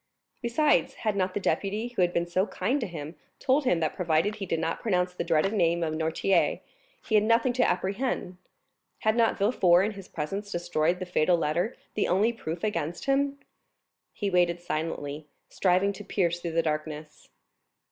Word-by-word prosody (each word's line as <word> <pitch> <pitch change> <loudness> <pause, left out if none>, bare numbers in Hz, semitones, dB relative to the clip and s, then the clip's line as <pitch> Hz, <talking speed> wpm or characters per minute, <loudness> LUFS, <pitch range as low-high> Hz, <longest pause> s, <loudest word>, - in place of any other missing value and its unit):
Besides, 275 +5 +2
had 215 -3 -1
not 185 -1 -1
the - - +1
deputy, 210 +4 -1
who 240 -6 -2
had 175 -1 +3
been 170 -1 0
so 185 +4 0
kind 250 +10 -1
to 230 - -2
him, 155 -3 -7 0.2
told 270 +2 +1
him 180 -9 +3
that 155 - 0
provided 170 +3 +1
he 195 -2 -5
did 165 - 0
not 165 0 -2
pronounce 180 -4 0
the - - -3
dreaded 170 +4 +1
name 170 -4 +2
of 155 -1 -1
Noirtier, 160 +4 +1 0.5
he - - -4
had 210 -1 +5
nothing 230 +3 +3
to 255 - +2
apprehend? 190 -1 -2 0.6
Had 220 0 +2
not 230 -1 +2
Villefort 190 -4 +4
in 215 - -1
his 195 -3 -10
presence 195 +7 -4
destroyed 175 -1 0
the 185 - -5
fatal 175 0 +2
letter, 170 +8 -1 0.2
the 210 - 0
only 210 +6 +2
proof 165 -6 -6
against 170 -5 -2
him? 275 +1 +1 0.7
He 200 -2 -3
waited 175 -1 +2
silently, 155 -3 -4 0.2
striving 190 +2 +2
to 210 - -9
pierce 175 -4 0
through 170 -1 -4
the 165 0 +2
darkness. 155 -1 -4
180 Hz, 180 wpm, -27 LUFS, 165-210 Hz, 0.7 s, had